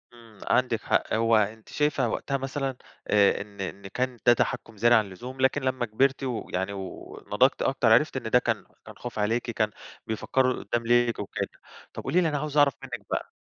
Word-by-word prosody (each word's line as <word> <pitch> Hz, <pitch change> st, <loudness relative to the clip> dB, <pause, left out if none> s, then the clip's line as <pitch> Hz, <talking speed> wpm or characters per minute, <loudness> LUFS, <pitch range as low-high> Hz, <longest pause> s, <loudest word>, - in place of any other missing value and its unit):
إمم 115 Hz, -3 st, -17 dB
عندِك 125 Hz, -3 st, +2 dB
حق -, -, 0 dB
هو 115 Hz, +1 st, +3 dB
أنتِ 110 Hz, +1 st, 0 dB
شايفة 150 Hz, -5 st, +1 dB
وقتها 140 Hz, +4 st, -2 dB
مثلًا 135 Hz, 0 st, -3 dB, 0.3 s
آآ 100 Hz, -2 st, +4 dB
إن 100 Hz, -1 st, -9 dB
إن 95 Hz, +1 st, -6 dB
كان 125 Hz, +5 st, -2 dB
ده 120 Hz, -, +8 dB
تحكُّم 115 Hz, -1 st, -2 dB
زيادة 120 Hz, +3 st, +5 dB
عن 110 Hz, -, +2 dB
اللزوم 125 Hz, +8 st, -8 dB
لكن 135 Hz, +2 st, +3 dB
لمّا 130 Hz, -2 st, 0 dB
كبرتِ 135 Hz, +5 st, +1 dB
ويعني 100 Hz, -6 st, -3 dB
و 100 Hz, -, -5 dB, 0.5 s
ونضجتِ -, -, +3 dB
أكتر -, -, +2 dB
عرفتِ -, -, +3 dB
إن -, -, -4 dB
ده -, -, +5 dB
كان -, -, -2 dB, 0.2 s
كان -, -, -11 dB
خوف 120 Hz, -3 st, -6 dB
عليكِ 115 Hz, +3 st, 0 dB
كان 110 Hz, -2 st, 0 dB, 0.4 s
بيفكروا 130 Hz, +4 st, +1 dB
لقدّام 120 Hz, -1 st, -3 dB
ليكِ 120 Hz, 0 st, +3 dB
وكده 100 Hz, -, -3 dB, 0.5 s
طَب -, -, -7 dB
قولِي 170 Hz, +7 st, +2 dB
لي 165 Hz, -, +2 dB
أنا 150 Hz, -, -1 dB
عاوز 150 Hz, 0 st, -3 dB
أعرف 145 Hz, -2 st, +5 dB
مِنّك 120 Hz, -6 st, -7 dB
بقى؟ -, -, -3 dB
120 Hz, 195 wpm, -27 LUFS, 110-130 Hz, 0.5 s, ده